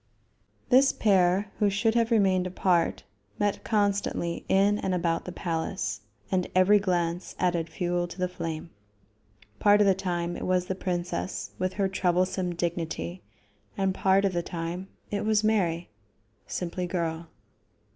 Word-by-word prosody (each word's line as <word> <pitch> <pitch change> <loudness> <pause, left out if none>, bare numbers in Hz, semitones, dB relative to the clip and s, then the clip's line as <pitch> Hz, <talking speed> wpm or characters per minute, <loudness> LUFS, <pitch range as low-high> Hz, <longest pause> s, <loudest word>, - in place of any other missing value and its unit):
This 270 +2 +6
pair, 195 -1 +2
who 210 - +4
should 210 +3 +1
have 230 -1 +2
remained 190 -5 +3
apart, 180 -2 +1 0.3
met 205 -1 0
constantly 200 -5 0
in 200 +2 +3
and 185 -1 -1
about 170 -2 0
the 180 - -5
palace, 160 - -3 0.3
and 185 -1 +1
every 190 +3 +6
glance 175 -2 -1
added 175 -2 0
fuel 175 -1 -1
to 175 - -10
the 185 -1 0
flame. 165 -2 -5 0.9
Part 205 0 +5
of 210 - +5
the 195 - +5
time 175 -2 -2
it - - -4
was 185 -1 +2
the 190 - -2
princess 180 -1 -3
with 185 0 -1
her 195 -1 +1
troublesome 185 -1 0
dignity, 160 - -3 0.6
and 195 -1 +1
part 195 +1 +3
of 195 - +1
the 175 - 0
time 170 +2 -5 0.2
it 205 0 -1
was 215 0 +2
Mary 180 -6 +1 0.6
simply 180 0 -3
girl. 170 -2 -2
185 Hz, 145 wpm, -27 LUFS, 175-195 Hz, 0.9 s, This